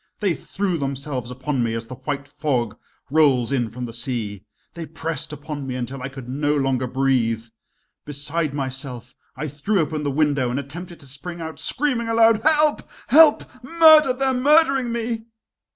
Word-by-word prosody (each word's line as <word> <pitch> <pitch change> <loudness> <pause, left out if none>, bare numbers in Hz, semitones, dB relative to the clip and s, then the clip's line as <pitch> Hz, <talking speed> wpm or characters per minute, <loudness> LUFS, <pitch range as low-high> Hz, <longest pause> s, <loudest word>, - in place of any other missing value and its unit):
They 200 -5 +1
threw 185 0 -3
themselves 135 -2 -4
upon 130 +1 -3
me 115 -1 -1
as 115 0 -4
the 125 - -9
white 140 +2 -5
fog 135 -7 -2 0.4
rolls 140 -6 +3
in 120 -4 0
from 125 +3 -6
the 115 - -8
sea, 115 -5 -4 0.3
they 165 -2 -7
pressed 160 -2 -5
upon 150 -2 -6
me 130 - -4
until 125 +1 -5
I 130 - -4
could 130 -2 -10
no 145 +3 0
longer 130 -2 0
breathe. 125 -4 0 0.6
Beside 150 +2 -2
myself, 130 -3 -5 0.2
I 155 - -4
threw 150 +9 -1
open 155 -1 -1
the 145 - -1
window 140 -3 +1
and 125 +3 -2
attempted 170 +5 -8
to - - -13
spring 150 +6 -7
out, 160 -2 -7
screaming 250 - 0
aloud: 225 -1 +4
"Help! 305 0 +5 0.3
help! 305 +2 +7 0.2
murder! 315 -1 +6
they 260 +2 -1
are 265 - +2
murdering 275 -1 +3
me!" 230 -1 -3
145 Hz, 170 wpm, -22 LUFS, 130-200 Hz, 0.6 s, help